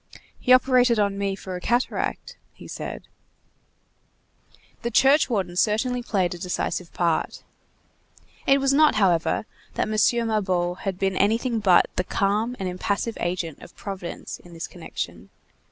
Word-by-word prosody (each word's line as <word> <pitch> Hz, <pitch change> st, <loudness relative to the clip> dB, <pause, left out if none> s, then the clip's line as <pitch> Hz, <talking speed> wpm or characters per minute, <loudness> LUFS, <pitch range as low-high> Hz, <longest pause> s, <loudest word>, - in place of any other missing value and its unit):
"He 250 Hz, -, 0 dB
operated 255 Hz, -2 st, +5 dB
on 200 Hz, -1 st, +1 dB
me 200 Hz, -1 st, -1 dB
for 190 Hz, -1 st, -7 dB
a 180 Hz, -, -6 dB
cataract," 240 Hz, +6 st, -1 dB, 0.2 s
he -, -, -13 dB
said. -, -, -6 dB, 1.8 s
The 235 Hz, -, -2 dB
churchwarden 240 Hz, -, +3 dB
had 175 Hz, -, -2 dB
certainly 245 Hz, +4 st, +1 dB
played 190 Hz, -7 st, 0 dB
a 175 Hz, -, -9 dB
decisive 180 Hz, 0 st, -3 dB
part. 170 Hz, -2 st, -1 dB, 1.0 s
It 275 Hz, 0 st, +5 dB
was 275 Hz, 0 st, +2 dB
not, 305 Hz, +2 st, +5 dB
however, 180 Hz, -2 st, +2 dB, 0.3 s
that -, -, 0 dB
M. 225 Hz, +2 st, +2 dB
Mabeuf 185 Hz, -5 st, 0 dB
had 195 Hz, -3 st, -3 dB
been 190 Hz, 0 st, 0 dB
anything 230 Hz, +3 st, +1 dB
but 190 Hz, -4 st, +5 dB
the 180 Hz, -, +2 dB
calm 210 Hz, +6 st, 0 dB
and 190 Hz, -, -2 dB
impassive 200 Hz, +5 st, -2 dB
agent 175 Hz, -3 st, -3 dB
of -, -, -13 dB
Providence 190 Hz, -4 st, -6 dB
in 175 Hz, -, -15 dB
this 165 Hz, -, -4 dB
connection. 175 Hz, -2 st, -7 dB
200 Hz, 145 wpm, -24 LUFS, 180-235 Hz, 1.8 s, operated